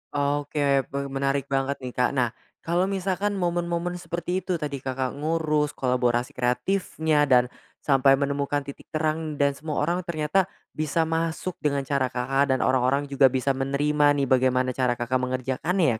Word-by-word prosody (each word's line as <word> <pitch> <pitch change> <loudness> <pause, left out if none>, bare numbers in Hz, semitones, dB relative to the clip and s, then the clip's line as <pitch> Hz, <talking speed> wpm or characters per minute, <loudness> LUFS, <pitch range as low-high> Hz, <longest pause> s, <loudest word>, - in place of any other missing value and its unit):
Oke, 145 -1 +1
pe 140 - -5
menarik 135 0 -1
banget 135 +1 0
nih, 125 - -4
Kak. 125 0 +1
Nah, 120 -3 +1 0.3
kalau 175 +3 +1
misalkan 195 +1 -1
momen-momen 175 -1 -1
seperti 175 +1 -3
itu 185 -1 -2
tadi 145 -4 -4
Kakak 130 -1 -2
ngurus 155 -1 0
kolaborasi 125 -1 0
kreatifnya, 150 +3 0
dan 125 -2 +4 0.3
sampai 135 -1 +5
menemukan 140 0 -1
titik 140 0 -10
terang 155 0 -1
dan 140 0 +4
semua 155 0 -4
orang 175 +4 0
ternyata 170 +3 0 0.2
bisa 155 +1 0
masuk 165 +2 -2
dengan 140 -2 0
cara 135 -1 0
Kakak, 130 +2 +1
dan - - -1
orang-orang 130 +2 +2
juga 135 0 +6
bisa 130 +1 0
menerima 145 +2 +2
nih 140 -1 0
bagaimana 130 0 +2
cara 125 -1 0
Kakak 120 +2 -1
mengerjakannya 130 - 0
140 Hz, 155 wpm, -25 LUFS, 130-160 Hz, 0.3 s, juga